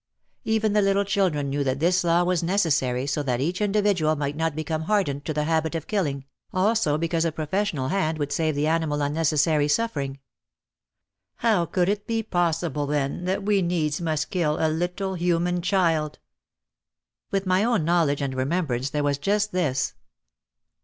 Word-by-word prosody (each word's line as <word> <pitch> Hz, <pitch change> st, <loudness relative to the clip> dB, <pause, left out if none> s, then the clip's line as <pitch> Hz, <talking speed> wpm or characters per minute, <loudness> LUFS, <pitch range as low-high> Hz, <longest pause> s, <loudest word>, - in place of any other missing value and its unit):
Even 220 Hz, -1 st, +1 dB
the 210 Hz, -, +4 dB
little 195 Hz, 0 st, +2 dB
children 175 Hz, -9 st, 0 dB
knew 140 Hz, +1 st, 0 dB
that 135 Hz, 0 st, -1 dB
this 180 Hz, +4 st, +2 dB
law 170 Hz, +1 st, +3 dB
was 180 Hz, -1 st, +1 dB
necessary 155 Hz, -9 st, +1 dB
so 145 Hz, +1 st, -1 dB
that 125 Hz, -4 st, -1 dB
each 175 Hz, +8 st, -1 dB
individual 200 Hz, -6 st, +2 dB
might 145 Hz, -1 st, -3 dB
not 160 Hz, -1 st, -1 dB
become 155 Hz, 0 st, -3 dB
hardened 170 Hz, -9 st, 0 dB
to -, -, -2 dB
the 150 Hz, 0 st, -1 dB
habit 160 Hz, +1 st, 0 dB
of 160 Hz, -, -3 dB
killing, 145 Hz, -10 st, -2 dB, 0.3 s
also 190 Hz, -5 st, +2 dB
because 165 Hz, 0 st, 0 dB
a 165 Hz, -, 0 dB
professional 155 Hz, -3 st, -2 dB
hand 160 Hz, -5 st, 0 dB
would 145 Hz, -1 st, -3 dB
save 155 Hz, 0 st, 0 dB
the 145 Hz, +1 st, 0 dB
animal 155 Hz, -2 st, 0 dB
unnecessary 150 Hz, 0 st, +2 dB
suffering. 145 Hz, -7 st, -1 dB, 1.2 s
How 205 Hz, -7 st, +1 dB
could 175 Hz, +2 st, +1 dB
it 205 Hz, +1 st, -1 dB
be 225 Hz, -1 st, -1 dB
possible 165 Hz, -5 st, -1 dB
then 145 Hz, +3 st, -1 dB
that 190 Hz, +2 st, -1 dB
we 205 Hz, -1 st, +2 dB
needs 170 Hz, -3 st, -1 dB
must 155 Hz, -3 st, -1 dB
kill 155 Hz, -5 st, 0 dB
a 160 Hz, -, +2 dB
little 180 Hz, +4 st, -2 dB
human 175 Hz, 0 st, 0 dB
child! 170 Hz, -5 st, +1 dB, 1.1 s
Within 195 Hz, -1 st, -1 dB
my 185 Hz, +2 st, +3 dB
own 230 Hz, -8 st, +1 dB
knowledge 160 Hz, -4 st, +2 dB
and 135 Hz, -1 st, -2 dB
remembrance 135 Hz, -1 st, -1 dB
there 150 Hz, 0 st, -1 dB
was 145 Hz, -1 st, 0 dB
just 205 Hz, +6 st, 0 dB
this 150 Hz, -8 st, 0 dB
165 Hz, 170 wpm, -25 LUFS, 145-185 Hz, 1.2 s, the